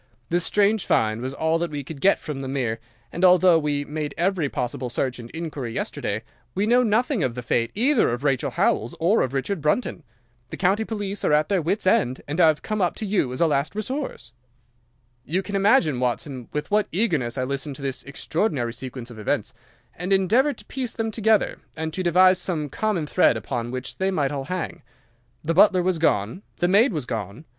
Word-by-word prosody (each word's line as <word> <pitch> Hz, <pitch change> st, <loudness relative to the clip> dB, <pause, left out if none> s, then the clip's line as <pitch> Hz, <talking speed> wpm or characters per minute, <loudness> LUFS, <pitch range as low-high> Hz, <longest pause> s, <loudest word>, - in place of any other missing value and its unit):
This 175 Hz, +1 st, +1 dB
strange 205 Hz, +2 st, +2 dB
find 110 Hz, +1 st, +1 dB
was 130 Hz, +2 st, -4 dB
all 160 Hz, +2 st, +1 dB
that 170 Hz, 0 st, -1 dB
we 145 Hz, -1 st, -5 dB
could 140 Hz, 0 st, -9 dB
get 195 Hz, -, +5 dB
from 145 Hz, -3 st, -6 dB
the 135 Hz, -, -5 dB
mere, 125 Hz, -4 st, -2 dB, 0.3 s
and, 175 Hz, -, -4 dB
although 180 Hz, -2 st, +6 dB
we 145 Hz, -2 st, -1 dB
made 150 Hz, -1 st, -4 dB
every 175 Hz, -3 st, +1 dB
possible 125 Hz, 0 st, -3 dB
search 125 Hz, +1 st, -2 dB
and 120 Hz, 0 st, -9 dB
inquiry 150 Hz, -7 st, -5 dB
yesterday, 105 Hz, +3 st, -3 dB, 0.3 s
we 200 Hz, -, +1 dB
know 240 Hz, +3 st, +4 dB
nothing 240 Hz, -, +1 dB
of 120 Hz, -3 st, -1 dB
the 125 Hz, -, -5 dB
fate 115 Hz, -1 st, 0 dB
either 250 Hz, +4 st, +3 dB
of 120 Hz, +3 st, -3 dB
Rachel 135 Hz, -3 st, +1 dB
Howells 115 Hz, -, 0 dB
or 180 Hz, +7 st, +3 dB
of 130 Hz, +1 st, -1 dB
Richard 160 Hz, +6 st, -2 dB
Brunton. 155 Hz, -, 0 dB, 0.5 s
The -, -, -7 dB
county 195 Hz, +4 st, +2 dB
police 205 Hz, -2 st, -4 dB
are -, -, +2 dB
at 150 Hz, +1 st, +3 dB
their 195 Hz, -3 st, +2 dB
wits' 185 Hz, +7 st, -1 dB
end, 130 Hz, -8 st, +2 dB
and 155 Hz, +5 st, 0 dB
I -, -, +7 dB
have 155 Hz, -1 st, +1 dB
come 215 Hz, -1 st, -2 dB
up 180 Hz, -, +1 dB
to 220 Hz, -, -5 dB
you 195 Hz, -11 st, 0 dB
as 130 Hz, -, -4 dB
a -, -, +6 dB
last 145 Hz, +2 st, 0 dB
resource.' 215 Hz, -, -4 dB, 0.9 s
"You 180 Hz, +8 st, -1 dB
can 200 Hz, +2 st, -5 dB
imagine, 195 Hz, -, +3 dB
Watson, 125 Hz, 0 st, -2 dB
with 150 Hz, +6 st, -4 dB
what 210 Hz, 0 st, +2 dB
eagerness 160 Hz, -, 0 dB
I 130 Hz, -, 0 dB
listened 140 Hz, +2 st, -3 dB
to 140 Hz, -, -10 dB
this 135 Hz, -2 st, -3 dB
extraordinary 140 Hz, -, -2 dB
sequence 125 Hz, -1 st, -8 dB
of 110 Hz, -, -10 dB
events, 105 Hz, -, -1 dB, 0.4 s
and 180 Hz, +3 st, -5 dB
endeavoured 225 Hz, +10 st, +3 dB
to -, -, -13 dB
piece 255 Hz, -3 st, -4 dB
them 225 Hz, -1 st, -2 dB
together, 220 Hz, -1 st, +2 dB, 0.2 s
and 160 Hz, 0 st, -4 dB
to 185 Hz, -, -2 dB
devise 185 Hz, +1 st, +5 dB
some 160 Hz, -5 st, -2 dB
common 210 Hz, -2 st, -1 dB
thread -, -, +3 dB
upon 120 Hz, -2 st, -4 dB
which 130 Hz, +1 st, -6 dB
they 190 Hz, 0 st, +1 dB
might 145 Hz, -7 st, 0 dB
all 140 Hz, -2 st, -4 dB
hang. 180 Hz, +2 st, -4 dB, 0.6 s
The 165 Hz, +2 st, 0 dB
butler 185 Hz, 0 st, +5 dB
was 180 Hz, -2 st, 0 dB
gone. 115 Hz, -, +1 dB, 0.2 s
The 175 Hz, -, +1 dB
maid 210 Hz, +8 st, +5 dB
was 150 Hz, -8 st, -3 dB
gone. 110 Hz, -, -5 dB
160 Hz, 210 wpm, -24 LUFS, 130-195 Hz, 0.9 s, I